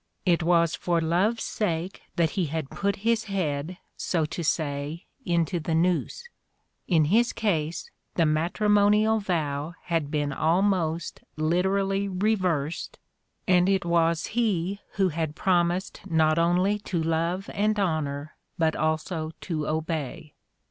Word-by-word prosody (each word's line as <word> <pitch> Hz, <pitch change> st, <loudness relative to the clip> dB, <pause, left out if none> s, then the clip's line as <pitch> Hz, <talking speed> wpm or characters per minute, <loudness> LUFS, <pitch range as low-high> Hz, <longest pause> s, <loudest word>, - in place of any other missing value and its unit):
It 175 Hz, -1 st, +3 dB
was 170 Hz, -1 st, +3 dB
for 175 Hz, -2 st, 0 dB
love's 180 Hz, +8 st, +1 dB
sake 180 Hz, -2 st, -2 dB
that 165 Hz, -2 st, +2 dB
he 185 Hz, -5 st, -1 dB
had 155 Hz, -2 st, -4 dB
put 200 Hz, 0 st, -1 dB
his 230 Hz, -1 st, +2 dB
head, 175 Hz, -4 st, -2 dB, 0.2 s
so 165 Hz, -4 st, 0 dB
to 165 Hz, +3 st, -5 dB
say, 150 Hz, +1 st, -2 dB, 0.2 s
into 170 Hz, 0 st, +1 dB
the 160 Hz, +1 st, -1 dB
noose; 180 Hz, -, 0 dB, 0.6 s
in 160 Hz, -4 st, +4 dB
his 230 Hz, +9 st, +3 dB
case 165 Hz, -6 st, -2 dB, 0.2 s
the 165 Hz, -, +3 dB
matrimonial 205 Hz, +7 st, +3 dB
vow 160 Hz, -5 st, -2 dB
had 165 Hz, -4 st, -1 dB
been 145 Hz, -2 st, -1 dB
almost 170 Hz, 0 st, 0 dB, 0.2 s
lite 170 Hz, +4 st, +2 dB
rally 195 Hz, 0 st, 0 dB
reversed 185 Hz, -6 st, -1 dB, 0.5 s
and 180 Hz, 0 st, +4 dB
it 195 Hz, -2 st, +1 dB
was 170 Hz, -1 st, +2 dB
he 200 Hz, -5 st, 0 dB
who 195 Hz, -2 st, +2 dB
had 160 Hz, -2 st, -3 dB
promised 175 Hz, +1 st, 0 dB
not 160 Hz, -1 st, +3 dB
only 180 Hz, +5 st, +2 dB
to 175 Hz, -5 st, -2 dB
love 165 Hz, +4 st, -1 dB
and 210 Hz, +1 st, +1 dB
honor 155 Hz, -5 st, -2 dB, 0.2 s
but 160 Hz, -1 st, +2 dB
also 155 Hz, +1 st, -1 dB
to 155 Hz, -4 st, -3 dB
obey. 155 Hz, -2 st, -3 dB
170 Hz, 135 wpm, -26 LUFS, 155-195 Hz, 0.6 s, in